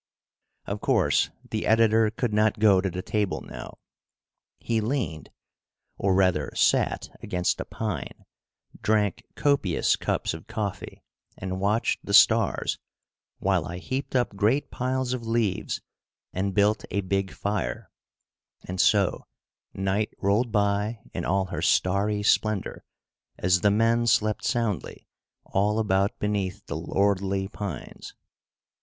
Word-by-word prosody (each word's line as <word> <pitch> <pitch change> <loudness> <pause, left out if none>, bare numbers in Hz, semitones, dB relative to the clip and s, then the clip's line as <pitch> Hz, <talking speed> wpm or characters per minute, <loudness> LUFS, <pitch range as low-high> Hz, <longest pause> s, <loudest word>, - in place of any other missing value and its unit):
Of - - -4
course - - +2 0.2
the - - -3
editor 110 0 +4
could 115 0 -2
not 105 +1 +2
go 105 -3 +5
to 95 - -1
the 90 +1 -5
table 105 -3 -1
now. - - -9 0.8
He 115 -2 -1
leaned, 105 - -2 0.7
or 95 -1 +1
rather 90 -7 +2
sat, - - +1
against 90 0 -1
a - - -5
pine, - - -5 0.6
drank 105 -2 +1
copious 140 - +2
cups - - -1
of 80 -1 -9
coffee 105 -3 -5 0.3
and 95 0 -4
watched 105 +4 0
the - - +1
stars, - - +4 0.6
while - - +1
I 85 - -5
heaped 130 +8 -4
up 120 -5 +1
great 110 +8 +1
piles 130 0 -1
of 120 -3 -5
leaves 115 -5 -1 0.5
and 95 +1 -2
built 105 +1 +3
a 100 - -1
big 95 0 -1
fire, 100 -13 -3 0.8
and 90 0 0
so 100 -3 +2 0.4
night 95 +2 -1
rolled 105 +4 +1
by 105 +1 +1 0.2
in - - -3
all 95 +1 +1
her 90 - -5
starry 105 +3 +2
splendor 105 -1 +1 0.5
as 90 0 +2
the 105 - +4
men 115 +3 +2
slept 110 -2 +2
soundly 115 -6 -2 0.4
all 105 +2 +1
about 100 -2 +1
beneath 100 -3 -2
the - - -5
lordly 100 -1 0
pines. 95 -8 -7
105 Hz, 130 wpm, -26 LUFS, 95-110 Hz, 0.8 s, go